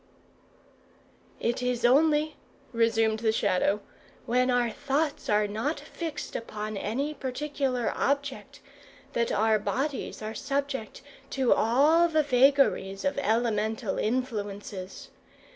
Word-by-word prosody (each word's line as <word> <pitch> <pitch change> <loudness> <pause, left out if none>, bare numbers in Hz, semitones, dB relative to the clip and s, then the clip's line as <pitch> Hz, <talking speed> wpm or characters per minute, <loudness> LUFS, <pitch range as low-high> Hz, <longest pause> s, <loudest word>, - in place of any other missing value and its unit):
"It 240 +1 -1
is 250 -1 0
only," 300 +4 +4 0.4
resumed 225 -1 +2
the 220 -1 +2
Shadow, 200 -1 +1 0.4
"when 250 +2 +2
our 245 -2 +2
thoughts 285 +3 -2
are 210 0 +3
not 225 +10 -2
fixed 325 -3 -6
upon 215 -1 -5
any 255 +10 -2
particular 270 -2 -2
object, 280 -1 -2 0.5
that 235 0 0
our 220 0 +3
bodies 270 +1 -3
are 215 +1 -4
subject 275 -1 -3 0.3
to 265 -3 +3
all 295 +9 +4
the 315 -2 +2
vagaries 260 -7 +3
of 280 0 0
elemental 220 -3 0
influences. 205 -5 -3
245 Hz, 110 wpm, -28 LUFS, 220-280 Hz, 0.5 s, only